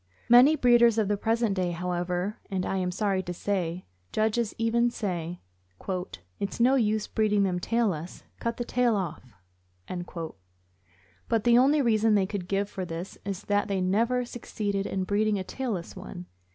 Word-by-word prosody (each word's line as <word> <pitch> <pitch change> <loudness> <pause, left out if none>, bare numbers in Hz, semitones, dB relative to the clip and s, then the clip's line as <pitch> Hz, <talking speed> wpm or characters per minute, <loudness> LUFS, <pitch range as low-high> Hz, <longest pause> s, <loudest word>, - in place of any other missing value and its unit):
Many 250 +6 +8
breeders 240 -4 +5
of 215 -3 +1
the 205 - +2
present 225 +1 +1
day, 185 -2 0
however, 180 +3 -2
and, 185 -2 -1
I 195 - -1
am 180 -1 0
sorry 195 0 0
to 175 -1 -6
say, 180 -2 -2 0.3
judges 220 +1 0
even, 235 +1 +2
say: 180 -6 -4 0.5
" 90 - -8
It's 200 - -3
no 250 +3 +5
use 215 -4 +2
breeding 210 -2 +1
them 180 -2 0
tailless. 185 -6 -1 0.2
Cut 235 0 -2
the 240 - -3
tail 245 -2 +2
off." 175 - -5 1.9
But 225 -2 +2
the 240 0 +6
only 285 +3 +4
reason 220 -2 +3
they 195 -2 +3
could 190 -2 -5
give 200 +1 0
for 190 -2 -5
this 170 +1 -6
is 200 0 -4
that 205 0 +1
they 195 -2 -1
never 230 +7 +1
succeeded 205 -4 -3
in 190 - -2
breeding 205 +2 +1
a 190 - -3
tailless 215 -5 -4
one. 185 -1 -8
205 Hz, 165 wpm, -27 LUFS, 185-230 Hz, 1.9 s, Many